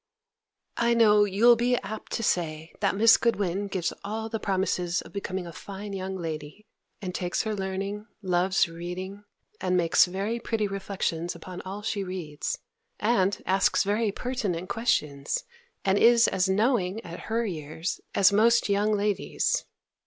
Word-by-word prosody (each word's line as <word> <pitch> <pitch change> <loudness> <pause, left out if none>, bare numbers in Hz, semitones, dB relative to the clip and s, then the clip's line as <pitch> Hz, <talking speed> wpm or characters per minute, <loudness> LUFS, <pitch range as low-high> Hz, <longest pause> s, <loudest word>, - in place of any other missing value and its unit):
I 235 0 +3
know 210 -3 +6
you'll 215 +5 +5
be 245 +2 +2
apt 215 +1 -6
to 230 - -1
say, 160 -5 -1
that 195 -1 +1
Miss 225 +2 +7
Goodwin 200 -4 0
gives 185 -3 -2
all 220 +2 -4
the 225 0 -3
promises 185 -3 0
of - - -14
becoming 190 -2 -3
a 170 - -7
fine 200 +4 -7
young 190 0 -4
lady, 160 +3 -6 0.4
and 180 -1 -3
takes 180 -1 -1
her 220 - -2
learning, 195 +2 -4 0.2
loves 185 0 +2
reading, 180 +4 -7 0.3
and 180 0 +1
makes 170 -2 +5
very 200 +6 -2
pretty 225 -2 -1
reflections 190 -4 -3
upon 180 -1 -8
all 200 +2 -6
she 205 -2 -1
reads, 175 -6 -4 0.4
and 205 -3 +1
asks 190 0 +3
very 210 +2 +1
pertinent 200 -7 -3
questions, 150 -11 0 0.4
and 195 +1 +3
is 235 0 +6
as 190 +1 +1
knowing, 205 -1 +1
at 170 +1 -7
her 230 +1 +1
years, 160 -2 -4
as 200 +1 +5
most 230 +2 +4
young 205 +2 +2
ladies. 205 -1 0
195 Hz, 155 wpm, -27 LUFS, 180-215 Hz, 0.4 s, Miss